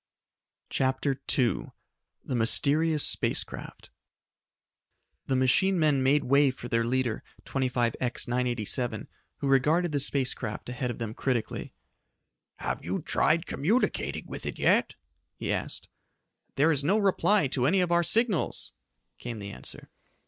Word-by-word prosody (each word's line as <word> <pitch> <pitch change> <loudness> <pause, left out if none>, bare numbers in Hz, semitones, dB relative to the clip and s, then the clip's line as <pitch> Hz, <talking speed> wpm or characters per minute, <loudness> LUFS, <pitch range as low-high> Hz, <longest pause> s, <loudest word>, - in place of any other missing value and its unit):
CHAPTER 135 +1 0 0.2
II 125 -3 +1 0.6
The - - -4
Mysterious 145 +6 +3
Space - - +2
Craft - - -11 1.4
The 135 - +1
machine 130 +9 +3
men 150 -4 +3
made 140 +2 +3
way 140 +2 +4
for 130 -2 -7
their 115 -1 +1
leader, 120 -1 -1 0.2
25X 125 -2 -1
987, 120 0 -1 0.3
who 140 - -3
regarded 150 +6 +3
the 145 - 0
space 135 -1 +1
craft 110 0 -6
ahead 125 0 -3
of 120 - -4
them 115 -2 -4
critically. 120 -2 -3 0.8
"Have - - -4
you 90 +3 -3
tried 160 +4 +1
communicating 205 - -1
with - - -7
it - - -4
yet?" - - +2 0.4
he - - -2
asked. - - -4 0.7
"There 155 +4 +4
is 145 -3 +1
no 190 +9 +3
reply 200 -2 +3
to 125 -1 +1
any 190 +6 +3
of 180 -1 +1
our 170 0 +4
signals," 220 0 0 0.5
came 120 -2 -6
the 100 -1 -7
answer. 65 - -10
135 Hz, 135 wpm, -28 LUFS, 125-155 Hz, 1.4 s, way